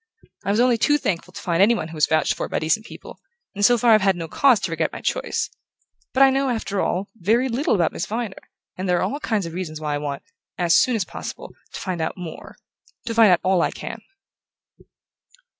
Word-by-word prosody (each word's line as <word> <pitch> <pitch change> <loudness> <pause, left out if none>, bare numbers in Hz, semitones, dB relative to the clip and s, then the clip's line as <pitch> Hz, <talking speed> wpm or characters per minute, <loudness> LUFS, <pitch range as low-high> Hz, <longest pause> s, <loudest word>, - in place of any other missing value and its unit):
I 200 - -3
was 205 +3 +2
only 245 -1 +3
too 295 +6 +3
thankful 180 -8 -3
to - - -9
find 170 0 +1
anyone 205 -6 +3
who - - -10
was 155 -2 +2
vouched 155 -1 +2
for - - -5
by - - -1
decent 165 +8 0
people; - - -11 0.3
and 205 -1 -3
so 240 +3 +6
far 235 +1 +3
I've 215 - +5
had 190 -1 +3
no 165 -2 -5
cause 255 - +4
to 170 - -3
regret 165 - -1
my - - -7
choice. - - -1 0.6
But 270 - +4
I 270 - +6
know, 270 0 +1
after 220 -4 -2
all, 190 +3 -1
very 225 +8 +2
little 255 +2 0
about 170 -4 +1
Miss 175 - -4
Viner; 225 -2 -4 0.3
and 185 0 -4
there 180 - +3
are - - 0
all 285 - -2
kinds 220 - -1
of 165 - -7
reasons 165 -4 -5
why 150 -1 -2
I - - 0
want, 145 -1 -5 0.3
as 170 -2 +3
soon 250 - +4
as 205 -5 -1
possible, - - -8 0.2
to - - -6
find 180 -3 -3
out 160 - -3
more 175 -3 -9 0.5
to 230 - -3
find 225 -4 +6
out 175 - +3
all 185 -1 +3
I - - +2
can." - - -7
195 Hz, 230 wpm, -22 LUFS, 170-230 Hz, 0.6 s, so